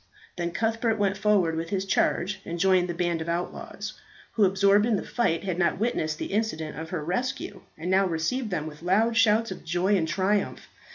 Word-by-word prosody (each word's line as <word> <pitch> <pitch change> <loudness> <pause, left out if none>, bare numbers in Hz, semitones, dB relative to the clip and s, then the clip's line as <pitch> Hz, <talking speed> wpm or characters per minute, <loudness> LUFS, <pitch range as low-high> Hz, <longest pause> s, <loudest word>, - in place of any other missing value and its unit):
Then 170 -1 -2
Cuthbert 225 +4 0
went 200 -2 +1
forward 195 -5 +2
with 165 +1 -3
his 195 0 -1
charge 190 0 0
and 170 - -5
joined 185 0 +3
the 175 - -3
band 175 -1 0
of 165 - -4
outlaws, 170 +1 -4 0.4
who, 215 - +3
absorbed 200 +3 +4
in 230 - +2
the - - -2
fight, 225 -9 0
had 185 -3 -2
not 175 - +2
witnessed 155 -8 -1
the - - -5
incident 160 -8 -1
of 160 0 -6
her 160 -4 -4
rescue, 245 +10 -3 0.2
and 170 +4 -3
now 190 +1 +4
received 215 +9 -1
them 165 -5 -2
with 150 -1 -9
loud 215 +6 +2
shouts 225 -1 +3
of 190 - -7
joy 180 +5 +1
and 165 -4 +1
triumph. 190 +5 0
190 Hz, 205 wpm, -26 LUFS, 170-210 Hz, 0.4 s, absorbed